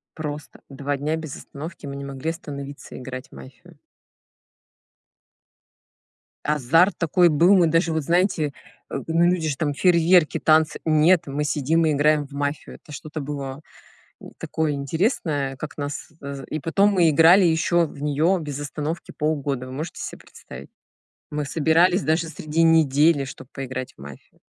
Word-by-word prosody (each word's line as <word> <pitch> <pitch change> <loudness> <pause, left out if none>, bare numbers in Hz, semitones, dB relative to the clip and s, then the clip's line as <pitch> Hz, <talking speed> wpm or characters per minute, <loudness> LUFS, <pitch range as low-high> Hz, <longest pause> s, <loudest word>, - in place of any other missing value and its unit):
Просто 150 -1 -7
2 140 +1 -3
дня 150 +3 -1
без 155 -4 -7
остановки, 150 +2 -9
мы 140 - -6
не 140 0 -6
могли 140 +3 -4
остановиться 140 -3 -8
играть 130 +3 -8
в - - -16
мафию. 170 +6 -14 2.7
Азарт 150 +6 +3
такой 175 +1 +3
был. 170 +6 +5
Мы 175 -3 +4
даже 165 +1 +2
вот, 160 - -1
знаете, 170 -2 +1 0.4
э, - - -6
ну, 165 +1 +3
люди 175 -2 +1
же 135 - -3
там 145 -2 -1
фейерверки, 170 -1 +3
танцы. 155 +1 +3
Нет, 160 +2 +4
мы 140 +2 -2
сидим 155 +3 +1
и 155 - +2
играем 150 +1 +2
в 140 - -28
"Мафию". 145 0 -4
Это - - -16
что-то 155 +1 -7
было, 140 0 -6 0.6
м, - - -11
такое 160 -2 -2
интересное, 145 - -1
как 150 - -8
нас 145 0 -5
з 140 -1 -6
и 155 - -3
потом 195 +7 +2
мы 175 -5 +4
играли 165 +6 +6
ещё 170 +1 +2
в 145 - -11
неё 150 +6 +2
без 145 -3 -5
остановки 150 +3 -5
полгода. 145 -4 -2
Вы 130 - -9
можете 155 +5 -6
се - - -6
представить? 65 +2 -13 0.6
Мы 150 -1 -3
собирались 165 +5 +3
даже 160 +1 +1
среди 160 0 -1
недели, 155 -2 +4
чтоб 130 - -10
поиграть 130 -1 -6
в - - -15
"Мафию". 70 -1 -13
150 Hz, 160 wpm, -23 LUFS, 140-165 Hz, 2.7 s, играли